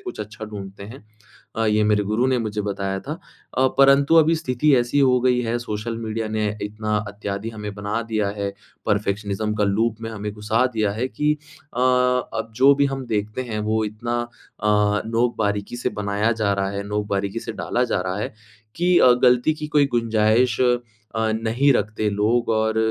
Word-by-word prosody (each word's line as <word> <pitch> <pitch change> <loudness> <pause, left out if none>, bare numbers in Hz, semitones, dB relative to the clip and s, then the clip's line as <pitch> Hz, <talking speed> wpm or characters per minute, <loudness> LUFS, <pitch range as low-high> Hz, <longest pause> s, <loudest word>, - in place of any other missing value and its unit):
कुछ 370 -3 -8
अच्छा 110 +2 -7
ढूँढते 100 -2 -8
हैं 110 +2 -11 0.5
अ, 115 0 0
ये 105 0 +3
मेरे 105 -1 +2
गुरु 110 +6 +1
ने 130 -1 +2
मुझे 105 -2 -2
बताया 100 -1 -3
था। 145 - -5 0.4
अ, 130 0 +4
परंतु 140 +3 +5
अभी 165 +1 +5
स्थिति 140 0 +1
ऐसी 120 +4 0
ही - - +5
हो 125 -1 +4
गई 125 -1 +3
है 120 0 -1
सोशल 115 0 -4
मीडिया 110 -1 -3
ने 110 0 -1 0.2
इतना 105 0 -2
इत्यादि 100 +1 -5
हमें 105 -2 -6
बना 105 +3 -2
दिया 105 -2 0
है। 100 -1 -2 0.3
परफेक्शनिज़्म 105 +1 -1
का 105 - +1
लूप 110 +3 +1
में 115 - -4
हमें 105 -1 -5
गुस्सा 110 +4 +1
दिया 105 -2 +1
है 115 +5 -2
कि 150 +3 0 0.4
अ, 125 - -3
अब 125 -2 +1
जो 135 +3 +6
भी 140 0 +3
हम 135 -1 -3
देखते 105 +2 -2
हैं। 110 -3 -4
वो 110 +1 0
इतना 120 +3 -3
अ, 120 -2 -8 0.4
नोक-बारीकी 110 -2 -1
से - - -1
बनाया 105 +3 +1
जा 110 -3 +1
रहा 95 0 -1
है, 100 0 -4
नोक-बारीकी 105 0 -2
से 115 - -6
डाला 125 +3 -1
जा 115 - 0
रहा 95 +1 -3
है - - -4 0.4
कि 175 +1 +3
अ, 125 - +7
गलती 125 +5 +4
की 150 -1 -6
कोई 145 -1 +3
गुंजाइश 115 +1 +2
अ, 125 - +4 0.5
नहीं 110 +5 +2
रखते 105 -2 0
लोग। 110 +4 +1
और 110 0 +1
110 Hz, 190 wpm, -22 LUFS, 105-125 Hz, 0.5 s, अ